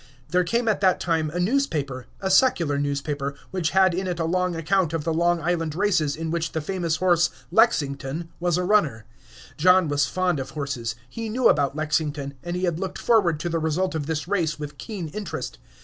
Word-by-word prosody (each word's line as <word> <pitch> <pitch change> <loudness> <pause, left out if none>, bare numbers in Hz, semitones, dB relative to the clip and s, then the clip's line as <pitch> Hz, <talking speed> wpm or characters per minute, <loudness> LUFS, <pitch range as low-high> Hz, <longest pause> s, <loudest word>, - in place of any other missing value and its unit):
There 180 +3 +3
came 230 +6 0
at 215 -2 +1
that 185 -2 +3
time 160 -3 0
a 175 +4 -4
newspaper, 160 - -1
a 190 -1 0
secular 170 - +3
newspaper, 140 0 -2 0.2
which 180 -4 0
had 190 0 +4
in 185 +2 -2
it 175 -1 -3
a 165 - 0
long 180 +1 0
account 165 +1 +1
of 165 -2 -1
the 165 +1 0
Long 170 +1 +2
Island 165 -2 -1
races, 170 -7 +1
in 160 0 -4
which 165 -1 -2
the 160 - 0
famous 170 0 -1
horse 175 -1 +3 0.2
"Lexington" 160 - +1
was 175 -1 +1
a 180 - 0
runner. 155 - +2 0.5
John 180 +1 +5
was 145 -2 +2
fond 180 0 0
of 135 0 -5
horses, 135 -6 -4
he 225 - -5
knew 245 +3 +3
about 140 -1 +2
Lexington, 150 -2 -1
and 175 +1 -4
he 180 - -3
had 170 -2 0
looked 190 -1 -4
forward 190 -10 +2
to 175 - -2
the 165 0 0
result 170 +4 0
of 150 -3 -3
this 160 -1 -2
race 175 -5 0
with 150 -1 -7
keen 190 -8 -5
interest. 210 +6 -5
165 Hz, 205 wpm, -24 LUFS, 150-185 Hz, 0.5 s, John